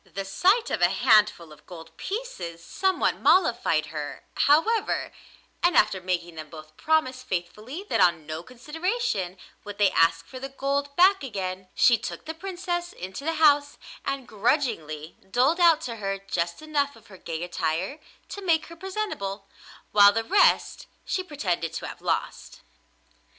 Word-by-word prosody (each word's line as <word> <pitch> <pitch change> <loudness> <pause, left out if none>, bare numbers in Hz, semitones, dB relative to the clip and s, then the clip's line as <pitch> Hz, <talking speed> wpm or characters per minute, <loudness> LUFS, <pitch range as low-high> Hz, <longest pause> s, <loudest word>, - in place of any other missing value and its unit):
The 195 0 -6
sight 375 - +2
of - - -1
a - - +5
handful 210 -9 +3
of 150 - -20
gold 165 -3 -11
pieces 180 - -6
somewhat 380 -1 0
mollified 240 - +3
her, 150 -2 -6
however, 330 +11 +2 0.5
and 350 -1 +3
after 200 -3 +3
making 175 -1 -2
them 155 -1 -9
both 155 -1 -12
promise 310 -5 +1
faithfully 210 - -5
that - - +1
on 170 -3 +3
no 155 +1 -5
consideration 255 - -3 0.3
would 205 -1 -8
they 200 -2 +4
ask 165 0 +3
for 255 +9 -9
the 270 +1 -6
gold 280 +1 -2
back 375 +1 +5
again, 190 -6 -4
she 235 -3 +5
took - - -7
the 320 - -4
Princess 350 0 -4
into 185 +8 -7
the 325 +2 -1
house 290 -2 +4 0.3
and 275 -2 -3
grudgingly 205 - -1
doled 260 - +2
out 335 -3 +5
to 235 -6 -5
her 195 -2 -2
just 175 - -3
enough 290 -2 -1
of 225 -1 -18
her 195 -4 -14
gay 165 0 -5
attire 175 - -2 0.3
to 405 - -7
make 330 -4 +2
her 335 - -10
presentable, 330 - -4 0.4
while 205 -1 +8
the 225 +2 -1
rest 390 - +3 0.2
she 375 - -1
pretended 185 - -3
to 165 - -5
have - - -8
lost. - - -3
225 Hz, 160 wpm, -26 LUFS, -, 0.5 s, while